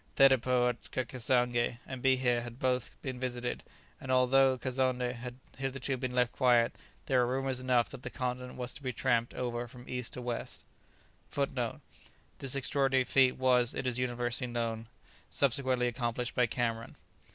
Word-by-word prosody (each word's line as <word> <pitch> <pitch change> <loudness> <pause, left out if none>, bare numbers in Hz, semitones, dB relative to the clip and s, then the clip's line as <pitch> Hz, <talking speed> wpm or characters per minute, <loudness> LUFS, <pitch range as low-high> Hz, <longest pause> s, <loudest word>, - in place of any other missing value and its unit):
Thedépôts 125 -2 +4
at 130 - 0
Cassange 120 -1 +1
and 130 -1 -7
Bihe 130 -2 +3
had 120 0 -8
both 125 -1 -1
been 130 -2 -4
visited, 125 -1 -3 0.4
and 130 - -5
although 130 +1 +4
Kazonndé 130 -1 0
had 125 0 -7 0.2
hitherto 135 0 -2
been 130 -1 -3
left 125 -1 +3
quiet, 120 -3 +3 0.3
there 130 -2 +2
were 120 +1 0
rumours 135 -1 0
enough 125 -2 +2
that - - -8
the - - -5
continent 125 -1 -4
was 125 -1 -4
to 150 - -10
be 130 -2 -2
tramped 120 -1 0
over 120 -1 -3
from 125 +1 -13
east 125 -2 -4
to 125 - -5
west. 120 -1 -4 0.7
[Footnote: - - -2 0.6
This 135 -1 +1
extraordinary 135 -1 +2
feat 130 0 +3
was, 125 -2 +3
it - - -3
is 125 -1 +1
universally 120 0 0
known, 115 -1 -2 0.4
subsequently 130 -2 +2
accomplished 120 0 -2
by 125 -1 +3
Cameron. 115 -1 -2
125 Hz, 160 wpm, -31 LUFS, 120-130 Hz, 0.7 s, Thedépôts